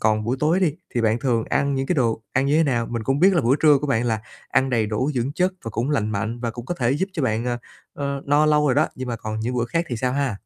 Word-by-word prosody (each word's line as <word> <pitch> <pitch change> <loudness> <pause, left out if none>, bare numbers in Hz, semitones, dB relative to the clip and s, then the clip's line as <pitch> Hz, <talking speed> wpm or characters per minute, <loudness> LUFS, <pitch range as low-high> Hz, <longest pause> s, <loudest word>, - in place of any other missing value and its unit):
còn 110 -1 +1
buổi 120 +4 -1
tối 160 +5 +2
đi 175 -6 +2 0.2
thì 120 - +1
bạn 115 +1 +2
thường 115 -3 0
ăn 140 0 +1
những 135 0 -1
cái 180 - +1
đồ 115 -6 0
ăn 135 +2 +1
như 145 +2 +3
thế 165 - +4
nào? 120 -4 0
Mình 115 -1 -4
cũng 135 +5 0
biết 190 +3 +5
là 170 - +3
bữa 130 +4 +3
trưa 150 -3 +6
của 150 - -3
bạn 120 -4 +1
là 110 -2 0 0.3
ăn 130 0 +2
đầy 115 -3 +1
đủ 110 +7 -1
dưỡng 125 +3 -1
chất 180 +3 +1
và 115 - -4
cũng 120 +7 -2
lành 110 -7 0
mạnh, 110 +3 -3
và 120 - -2
cũng 120 +1 -8
có 175 - -2
thể 125 -7 0
giúp 180 +8 0
cho 160 - -3
bạn, 115 -2 0
à, 120 -1 -1 0.4
ờ, 140 -1 -3
no 145 +2 +3
lâu 150 0 +3
rồi 130 - +3
đó. 155 +2 +3
Nhưng 130 -1 -6
mà 120 - -2
còn 110 0 -5
những 125 +3 -2
bữa 120 - +1
khác 165 +8 -1
thì 120 - -3
sao 125 +2 -1
ha? 135 -6 -1
130 Hz, 315 wpm, -23 LUFS, 115-145 Hz, 0.4 s, trưa